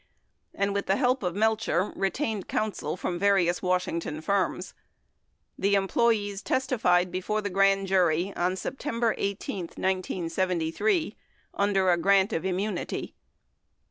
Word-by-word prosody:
and, 200 Hz, 0 st, 0 dB
with 200 Hz, 0 st, -2 dB
the 195 Hz, -, +3 dB
help 255 Hz, +2 st, +1 dB
of 180 Hz, -3 st, -2 dB
Melcher, 215 Hz, -3 st, +1 dB
retained 200 Hz, -, -2 dB
counsel 215 Hz, -4 st, -2 dB
from 175 Hz, -1 st, -3 dB
various 190 Hz, -3 st, +2 dB
Washington 180 Hz, -4 st, -1 dB
firms. 195 Hz, +4 st, -1 dB, 0.9 s
The 200 Hz, +1 st, +3 dB
employees 205 Hz, 0 st, +1 dB
testified 215 Hz, -9 st, +1 dB
before 210 Hz, +4 st, -2 dB
the 205 Hz, -, -3 dB
grand 195 Hz, +1 st, +3 dB
jury 185 Hz, -1 st, +2 dB
on 180 Hz, +1 st, 0 dB
September 230 Hz, +1 st, -2 dB
18, 200 Hz, -2 st, -3 dB
1973, 185 Hz, -, -1 dB, 0.4 s
under 195 Hz, -2 st, +2 dB
a 175 Hz, -, +3 dB
grant 195 Hz, +4 st, +3 dB
of 165 Hz, -, -1 dB
immunity. 190 Hz, 0 st, -3 dB
195 Hz, 120 wpm, -27 LUFS, 180-210 Hz, 0.9 s, the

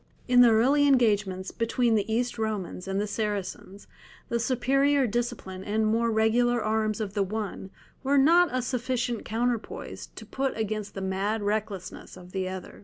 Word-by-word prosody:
In 250 Hz, -1 st, +6 dB
the 245 Hz, -, +8 dB
early 265 Hz, +6 st, +4 dB
engagements 205 Hz, -8 st, +2 dB
between 230 Hz, +1 st, +1 dB
the 215 Hz, 0 st, 0 dB
East 240 Hz, +1 st, -1 dB
Romans 205 Hz, -4 st, -3 dB
and 195 Hz, 0 st, -1 dB
the 205 Hz, -, 0 dB
Saracens 205 Hz, -2 st, -4 dB, 0.4 s
the 235 Hz, -, 0 dB
superior 270 Hz, +3 st, +2 dB
discipline 230 Hz, -5 st, -3 dB
and 215 Hz, +2 st, 0 dB
more 230 Hz, +2 st, +2 dB
regular 235 Hz, +2 st, +2 dB
arms 215 Hz, 0 st, 0 dB
of 205 Hz, -3 st, -3 dB
the 205 Hz, -, 0 dB
one 200 Hz, -1 st, -4 dB, 0.3 s
were 280 Hz, +1 st, +2 dB
not 340 Hz, +6 st, +5 dB
a 255 Hz, -1 st, -1 dB
sufficient 250 Hz, -1 st, -2 dB
counterpoise 235 Hz, 0 st, -3 dB
to -, -, -11 dB
put 270 Hz, -2 st, -2 dB
against 215 Hz, -1 st, -3 dB
the 195 Hz, -, -4 dB
mad 195 Hz, +3 st, -1 dB
recklessness 205 Hz, -3 st, -4 dB
of 180 Hz, 0 st, -13 dB
the 185 Hz, -1 st, -2 dB
other. 185 Hz, -1 st, -8 dB
220 Hz, 165 wpm, -27 LUFS, 205-245 Hz, 0.4 s, the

